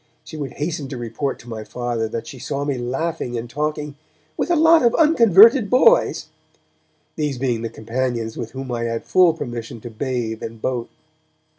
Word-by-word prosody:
She -, -, -11 dB
would 145 Hz, -4 st, -5 dB
hasten 150 Hz, -1 st, -3 dB
to 130 Hz, -1 st, -6 dB
report 120 Hz, +4 st, -3 dB
to 120 Hz, -, -16 dB
my 110 Hz, -2 st, -6 dB
Father 120 Hz, -1 st, -3 dB
that 115 Hz, +1 st, -5 dB
she 130 Hz, -, -10 dB
saw 140 Hz, +3 st, -3 dB
me 140 Hz, -2 st, -1 dB
laughing 125 Hz, +1 st, -3 dB
and 115 Hz, +1 st, -5 dB
talking 150 Hz, +3 st, -3 dB, 0.4 s
'with -, -, -2 dB
a 350 Hz, -, +3 dB
lot 325 Hz, +1 st, +6 dB
of 235 Hz, -2 st, +3 dB
unconverted 230 Hz, -, +6 dB
boys', 465 Hz, -, +4 dB, 0.9 s
these 150 Hz, -4 st, -1 dB
being 120 Hz, -3 st, -1 dB
the 115 Hz, -, -3 dB
companions 115 Hz, 0 st, -3 dB
with 115 Hz, -1 st, -6 dB
whom 135 Hz, -1 st, -6 dB
I 115 Hz, -1 st, -2 dB
had 115 Hz, 0 st, -3 dB
full 180 Hz, -3 st, +4 dB
permission 120 Hz, -6 st, -6 dB
to 120 Hz, -, -8 dB
bathe 115 Hz, -2 st, -3 dB
and 115 Hz, 0 st, -7 dB
boat. 120 Hz, 0 st, -3 dB
130 Hz, 180 wpm, -21 LUFS, 115-160 Hz, 0.9 s, lot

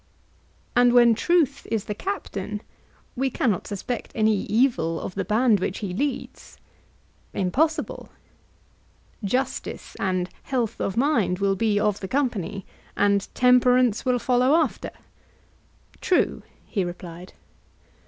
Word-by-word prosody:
And 245 Hz, 0 st, +5 dB
when 240 Hz, -1 st, +7 dB
truth 285 Hz, +2 st, +1 dB
is 220 Hz, -2 st, -1 dB
the 210 Hz, -, -3 dB
captain, 210 Hz, -, -5 dB, 0.5 s
we 265 Hz, +2 st, 0 dB
cannot 225 Hz, -7 st, -1 dB
suspect 225 Hz, +5 st, -4 dB
any 220 Hz, -1 st, +3 dB
evil 210 Hz, -9 st, +1 dB
of -, -, -6 dB
the 195 Hz, -, -2 dB
band 215 Hz, +2 st, +3 dB
which 185 Hz, +1 st, -2 dB
he 200 Hz, -4 st, -4 dB
leads? 275 Hz, +7 st, -4 dB, 0.8 s
Impossible. 305 Hz, -, 0 dB, 1.1 s
Justice 255 Hz, +7 st, -3 dB
and 185 Hz, -2 st, 0 dB
health 245 Hz, -5 st, -2 dB
of 195 Hz, -, -2 dB
mind 230 Hz, -, +2 dB
will 195 Hz, 0 st, +1 dB
be 210 Hz, 0 st, +1 dB
of 210 Hz, -1 st, +1 dB
the 190 Hz, -, -5 dB
company, 205 Hz, -, -2 dB, 0.3 s
and 200 Hz, -1 st, +2 dB
temperance 250 Hz, -2 st, +4 dB
will 250 Hz, -1 st, +2 dB
follow 250 Hz, +3 st, +3 dB
after? 330 Hz, -, 0 dB, 1.1 s
True, 365 Hz, -, +1 dB, 0.2 s
he 195 Hz, -, -1 dB
replied. 175 Hz, 0 st, -8 dB
220 Hz, 120 wpm, -24 LUFS, 195-255 Hz, 1.1 s, when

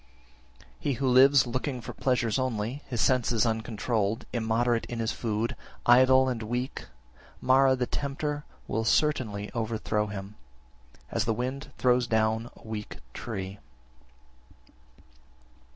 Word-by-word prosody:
7. -, -, -22 dB
He 140 Hz, -, 0 dB
who 130 Hz, +2 st, -1 dB
lives 130 Hz, +1 st, +6 dB
looking 125 Hz, +2 st, -3 dB
for 115 Hz, -, -7 dB
pleasures 125 Hz, -2 st, 0 dB
only, 125 Hz, +1 st, -2 dB
his 120 Hz, -3 st, -2 dB
senses 120 Hz, -3 st, +2 dB
uncontrolled, 110 Hz, -1 st, -1 dB
immoderate 115 Hz, 0 st, +1 dB
in 120 Hz, -, -5 dB
his 115 Hz, 0 st, -1 dB
food, 110 Hz, 0 st, -2 dB, 0.3 s
idle, 130 Hz, +2 st, +6 dB
and 125 Hz, -3 st, -2 dB
weak, 120 Hz, +4 st, -3 dB, 0.5 s
Mara 130 Hz, +1 st, +4 dB
(the 125 Hz, -1 st, -1 dB
tempter) 145 Hz, +2 st, -3 dB, 0.2 s
will 110 Hz, -, -1 dB
certainly 110 Hz, -6 st, +1 dB
overthrow 110 Hz, -2 st, -1 dB
him, 100 Hz, 0 st, -7 dB, 0.7 s
as 115 Hz, 0 st, 0 dB
the 115 Hz, -1 st, 0 dB
wind 130 Hz, +3 st, -4 dB
throws 125 Hz, -1 st, +3 dB
down 110 Hz, +1 st, +1 dB
a -, -, -16 dB
weak 105 Hz, -1 st, -6 dB, 0.2 s
tree. 100 Hz, -3 st, -5 dB
120 Hz, 125 wpm, -28 LUFS, 110-130 Hz, 0.7 s, lives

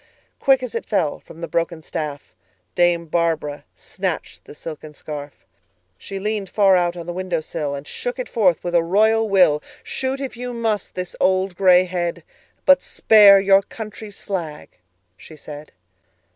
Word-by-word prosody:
Quick, 265 Hz, -1 st, +3 dB
as 250 Hz, -, -5 dB
it 230 Hz, -, -4 dB
fell, 170 Hz, -9 st, 0 dB
from 165 Hz, -, -14 dB
the 170 Hz, -, -4 dB
broken 165 Hz, +1 st, -2 dB
staffDame 145 Hz, -, -3 dB
Barbara 155 Hz, -4 st, -1 dB
snatched -, -, -5 dB
the -, -, -12 dB
silken 155 Hz, -1 st, -9 dB
scarf; 145 Hz, -1 st, -9 dB, 0.5 s
She 195 Hz, -, -8 dB
leaned 205 Hz, -1 st, -3 dB
far 195 Hz, -1 st, +4 dB
out 175 Hz, -1 st, +1 dB
on 170 Hz, -, -7 dB
the 175 Hz, -, -5 dB
window 185 Hz, -2 st, -2 dB
sill, 155 Hz, -2 st, -4 dB
And 140 Hz, +1 st, -8 dB
shook -, -, -4 dB
it -, -, -4 dB
forth 185 Hz, -8 st, +2 dB
with 175 Hz, -, -3 dB
a 170 Hz, -, +5 dB
royal 220 Hz, +6 st, +2 dB
will."Shoot, 195 Hz, -, +1 dB
if 270 Hz, -2 st, -5 dB
you 245 Hz, +1 st, -5 dB
must, 225 Hz, -3 st, -2 dB
this 180 Hz, -1 st, -5 dB
old 185 Hz, 0 st, +1 dB
gray 180 Hz, -1 st, +5 dB
head, 175 Hz, -2 st, -3 dB, 0.4 s
But 280 Hz, -1 st, +6 dB
spare 205 Hz, -3 st, +6 dB
your 195 Hz, 0 st, +5 dB
country's 215 Hz, 0 st, -9 dB
flag," 170 Hz, -7 st, -5 dB, 0.5 s
she 155 Hz, -, -13 dB
said. 150 Hz, 0 st, -10 dB
180 Hz, 160 wpm, -21 LUFS, 155-210 Hz, 0.5 s, But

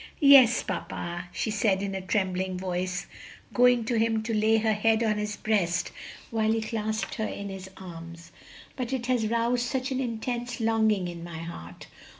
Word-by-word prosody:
"Yes, 270 Hz, -5 st, +7 dB
papa," 175 Hz, -2 st, -5 dB
she 220 Hz, -, -2 dB
said 205 Hz, -2 st, +1 dB
in 195 Hz, -1 st, -3 dB
a 190 Hz, -, -3 dB
trembling 185 Hz, -1 st, -1 dB
voice, 185 Hz, 0 st, -2 dB, 0.5 s
going 245 Hz, -2 st, +4 dB
to 230 Hz, 0 st, +1 dB
him 225 Hz, -1 st, +1 dB
to 230 Hz, 0 st, -2 dB
lay 220 Hz, +1 st, +3 dB
her 220 Hz, 0 st, +2 dB
head 220 Hz, +2 st, +2 dB
on 215 Hz, -2 st, +1 dB
his 210 Hz, 0 st, -3 dB
breast 185 Hz, -6 st, 0 dB, 0.4 s
while 220 Hz, -1 st, +1 dB
he 225 Hz, -, +1 dB
clasped 220 Hz, 0 st, -2 dB
her 220 Hz, -1 st, -2 dB
in 200 Hz, 0 st, -5 dB
his 190 Hz, -1 st, -7 dB
arms, 170 Hz, -2 st, -10 dB, 0.4 s
"but 255 Hz, -1 st, -3 dB
it 250 Hz, -2 st, -2 dB
has 245 Hz, -3 st, +1 dB
roused 235 Hz, +2 st, +1 dB
such 265 Hz, 0 st, -2 dB
an 260 Hz, -, -1 dB
intense 240 Hz, 0 st, -3 dB
longing 220 Hz, -4 st, +2 dB
in 170 Hz, -1 st, -7 dB
my 170 Hz, -1 st, -7 dB
heart! 90 Hz, -, -8 dB
215 Hz, 175 wpm, -27 LUFS, 185-230 Hz, 0.5 s, Yes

